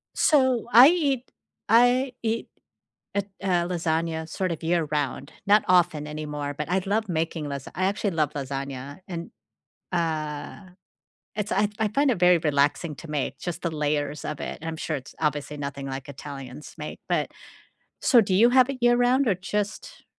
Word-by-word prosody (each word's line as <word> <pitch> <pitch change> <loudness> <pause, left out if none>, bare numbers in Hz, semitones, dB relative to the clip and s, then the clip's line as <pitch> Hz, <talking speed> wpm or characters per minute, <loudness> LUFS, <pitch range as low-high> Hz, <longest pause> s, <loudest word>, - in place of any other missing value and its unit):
So, 260 -6 +3
I 245 +4 +10
eat 280 -8 0 0.4
I 245 +3 +4
eat 225 0 -1 0.7
it 200 0 -1
uh, 180 -3 +2
lasagna, 165 -2 -1
sort 185 +2 -2
of, 165 - -6
year 165 0 +1
round, 145 -1 -2
not 210 +1 +5
often 175 -5 +3
anymore, 150 -1 -4
but 150 +2 -4
I 190 - +2
love 215 +2 0
making 160 -2 -2
lasa 140 -1 -6
I 185 - -1
actually 200 0 -1
love 155 -2 0
lasagna, 140 0 -5
and, 170 -2 -6 0.6
uh, 160 +2 -3 0.7
it's 210 -1 -3
I 210 - +3
I 220 - +2
find 275 +6 +2
it 225 - -1
very 180 -1 +6
relaxing 150 +1 +1
to 165 - -10
make, 140 -2 -2
just 175 -2 -5
the 170 - -2
layers 150 -1 -1
of 150 - -4
it, - - -5
and 165 - -6
I'm 160 -1 -4
sure 155 - -2
it's 130 - -12
obviously 150 -1 -1
nothing 140 -1 -5
like 135 +1 -6
Italians 140 0 -9
make, - - -7
but - - 0 0.7
so 245 -4 +6
do 195 -3 0
you 230 +5 +6
have 255 +1 +5
it 270 - -5
year 240 0 +5
round, 250 +2 +3
or 200 - +3
just 205 +3 -4
170 Hz, 175 wpm, -25 LUFS, 150-210 Hz, 0.7 s, I